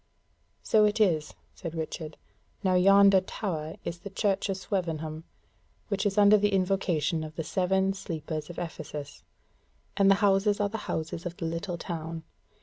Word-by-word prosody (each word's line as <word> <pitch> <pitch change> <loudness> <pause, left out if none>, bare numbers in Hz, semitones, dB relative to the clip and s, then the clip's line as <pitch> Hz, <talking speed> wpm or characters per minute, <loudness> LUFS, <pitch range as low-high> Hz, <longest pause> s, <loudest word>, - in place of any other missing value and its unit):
"So 215 -1 +4
it 210 +1 +1
is," 165 -8 +2 0.2
said 165 -2 -7
Richard; 160 -1 -5 0.5
"now 185 -1 +2
yonder 195 +1 +6
tower 165 -5 -4
is 170 - -3
of - - -29
the 200 - -6
Church 200 0 0
of 195 - -1
Swevenham, 160 -5 -3 0.6
which 200 0 0
is 200 +1 -3
under 205 +1 +7
the 205 0 +1
invocation 180 -4 +1
of 155 0 -8
the 160 - -3
Seven 190 +3 +1
Sleepers 160 -4 -5
of 175 - -9
Ephesus; 150 -4 -6 0.7
and 195 -1 +4
the 195 - +7
houses 200 +1 +3
are 205 -1 +1
the 220 +2 -4
houses 160 +2 -3
of 175 - -8
the 165 - -4
little 170 +2 -3
town. 165 -1 -5
180 Hz, 165 wpm, -28 LUFS, 160-195 Hz, 0.7 s, under